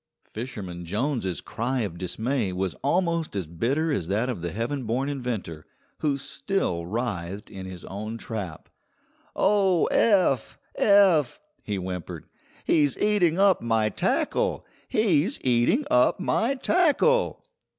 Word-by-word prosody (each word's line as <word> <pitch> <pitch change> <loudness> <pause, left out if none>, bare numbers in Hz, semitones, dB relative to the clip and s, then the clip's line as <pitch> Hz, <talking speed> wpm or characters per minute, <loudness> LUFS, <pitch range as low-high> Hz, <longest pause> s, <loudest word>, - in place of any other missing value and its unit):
Fisherman 100 -7 -7
Jones's 105 - -2
cry 125 +3 -2
of 90 -6 -4
dismay 110 +4 -1
was 90 0 -2
almost 170 - 0
as 95 -3 -2
bitter 130 - -1
as 90 - -1
that 110 +7 0
of 110 -9 -4
the 85 0 -3
heaven 120 +5 -3
born 125 +5 -1
inventor, 120 - -4 0.4
who 145 -3 0
still 130 - -2
writhed 100 -3 -4
in 95 -2 -7
his 90 -2 -9
own 110 +3 -5
trap. 100 -8 -6 0.7
"Oh, 195 -4 +3
Eph! 185 - +2 0.2
Eph!" 190 - +4 0.2
he 105 - -3
whimpered, 90 -2 -5 0.4
"he's 145 -4 +3
eating 190 -6 +2
up 195 -1 +4
my 115 -2 +1
tackle! - - 0 0.2
He's 210 - +2
eating 125 - +2
up 125 +8 +4
my 230 +7 +1
tackle!" 365 - +2
125 Hz, 130 wpm, -26 LUFS, -, 0.7 s, Eph